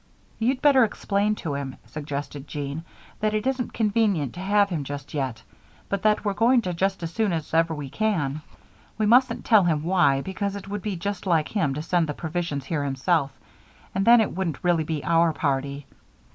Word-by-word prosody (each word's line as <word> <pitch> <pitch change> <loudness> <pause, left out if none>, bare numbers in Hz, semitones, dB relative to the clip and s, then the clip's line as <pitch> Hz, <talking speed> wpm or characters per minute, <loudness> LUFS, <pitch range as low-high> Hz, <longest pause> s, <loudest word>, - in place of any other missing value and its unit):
"You'd 255 +5 0
better 275 -4 +6
explain 205 -1 0
to 160 -7 -4
him," 140 -2 -4
suggested 145 -1 -6
Jean, 145 +2 -5 0.4
"that 215 0 0
it 215 +2 -1
isn't 260 -2 -1
convenient 205 - +1
to 175 - -9
have 200 +2 +2
him 165 -6 -2
just 145 +1 -7
yet, 130 -6 -3 0.5
but 200 -1 -1
that 215 0 +2
we're 205 - +1
going 235 +3 +3
to 180 - -2
just 190 +1 -1
as 165 0 -4
soon 220 -4 +1
as 160 -1 -4
ever 165 0 +2
we 145 -2 -5
can. 155 -6 -1 0.6
We 215 - +1
mustn't 250 +5 +3
tell 215 -5 +5
him 155 -3 +1
why, 155 -6 +3
because 200 +4 -3
it 200 -1 -8
would 205 0 -4
be 205 -1 -3
just 200 +2 -4
like 165 -4 +2
him 145 -11 0
to 150 - -4
send 170 0 +1
the 150 - -3
provisions 160 -4 -3
here 145 0 -1
himself, 140 +2 +1 0.6
and 195 - 0
then 235 +2 +7
it 215 - -1
wouldn't 175 -6 -3
really 175 -3 +2
be 155 -2 -3
our 165 -1 +3
party." 140 -2 -2
175 Hz, 200 wpm, -25 LUFS, 145-205 Hz, 0.6 s, then